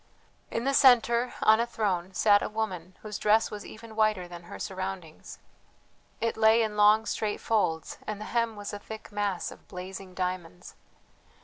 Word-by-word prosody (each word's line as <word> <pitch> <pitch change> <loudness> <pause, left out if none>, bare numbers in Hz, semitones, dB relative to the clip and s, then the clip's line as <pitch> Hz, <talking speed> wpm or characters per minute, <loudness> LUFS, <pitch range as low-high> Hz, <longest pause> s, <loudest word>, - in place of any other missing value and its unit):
In 230 - -2
the 275 +2 +1
centre, 245 -2 +5
on 220 +1 +6
a 235 - +1
throne, 190 -5 -2
sat 205 -1 +5
a - - -2
woman 190 -5 -4
whose 210 -1 -5
dress 215 +1 +3
was 210 0 -6
even 220 0 -11
whiter 215 -4 +1
than 175 -1 -10
her - - -9
surroundings. 190 -4 -6 0.8
It 230 - -1
lay 220 +1 +5
in 215 -1 -3
long 210 +1 +5
straight 215 -1 -2
folds, 165 -8 -1
and 215 -1 -3
the 215 - -6
hem 230 -1 0
was 205 0 -6
a 205 - -5
thick 220 +1 -10
mass 205 -3 -2
of - - -15
blazing 185 0 -8
diamonds. 180 -1 -4
210 Hz, 175 wpm, -28 LUFS, 185-220 Hz, 0.8 s, on